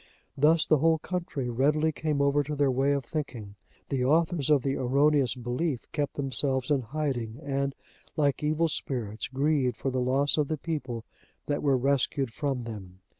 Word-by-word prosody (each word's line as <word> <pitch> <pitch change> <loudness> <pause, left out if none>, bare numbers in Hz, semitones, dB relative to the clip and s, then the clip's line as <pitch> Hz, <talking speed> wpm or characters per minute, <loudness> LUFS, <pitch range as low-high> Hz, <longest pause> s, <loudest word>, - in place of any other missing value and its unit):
Thus 155 +3 +4
the 155 - +3
whole 160 +2 +4
country 170 -6 -4
readily 150 +6 +2
came 150 -2 -1
over 140 +1 +3
to 150 +1 -4
their 140 -2 +2
way 135 +2 +2
of 140 -3 -2
thinking; 120 -9 -5 0.4
the 130 -2 0
authors 155 +1 +2
of 145 -4 +4
the 135 -1 0
erroneous 135 0 +2
belief 125 +3 -2
kept 145 -2 -2
themselves 135 -1 +1
in 140 -2 +3
hiding, 125 -3 -3
and, 140 -1 -1 0.4
like 145 -3 +1
evil 155 +2 +1
spirits, 120 -8 -3
grieved 135 -3 +1
for 135 - -2
the 130 0 -1
loss 135 +4 +2
of 150 - +2
the 155 - -2
people 130 -8 -4 0.4
that 145 - -1
were 140 -3 +3
rescued 135 -1 0
from 135 -3 -2
them. 95 -5 -9
140 Hz, 175 wpm, -28 LUFS, 125-150 Hz, 0.4 s, Thus